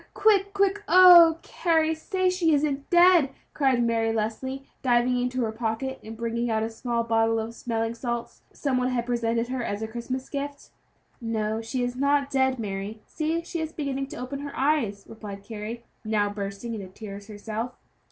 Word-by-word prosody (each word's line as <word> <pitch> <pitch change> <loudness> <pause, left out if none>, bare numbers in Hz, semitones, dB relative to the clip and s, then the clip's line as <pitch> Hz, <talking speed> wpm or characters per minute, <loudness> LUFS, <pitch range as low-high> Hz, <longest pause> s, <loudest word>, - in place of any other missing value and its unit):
quick! 400 -2 +3
quick! 400 0 +1
Oh, 345 -2 +9
Carry, 320 -2 +1
say 370 +4 -1
she 340 -4 +2
isn't 280 -1 -1
dead!" 350 -4 +6 0.2
cried 265 -4 +2
Mary 225 -1 +1
Leslie, 225 +5 -3 0.2
diving 245 0 +2
into 250 0 -1
her 220 - -1
pocket 230 +4 -3
and 220 +1 -8
bringing 235 +1 -2
out 220 -1 +1
a 225 - -3
small 235 +1 -2
bottle 225 0 +2
of 225 +1 -4
smelling 225 -1 -2
salts 235 0 -4
that - - -24
some 275 -3 0
one 250 - +1
had 245 -2 -1
presented 235 -1 0
her 255 -1 -2
as 205 -1 -3
a - - -2
Christmas 240 +3 -5
gift. 285 0 -6 0.5
"No, 220 -1 -1
she 245 +2 -2
is 245 0 -2
not 280 +1 +1
dead, 265 -1 +2
Mary; 210 0 -5
see, 325 +2 -2
she 340 0 -5
is 320 0 -4
beginning 275 -2 -3
to - - -9
open 255 +3 -5
her 285 0 -7
eyes," 260 -9 +1
replied 205 -3 -9
Carry, 225 +2 -6 0.2
now 210 -2 +1
bursting 200 +3 -5
into 200 -4 -6
tears 200 +1 -9
herself. 220 +3 -5
240 Hz, 180 wpm, -26 LUFS, 225-285 Hz, 0.5 s, Oh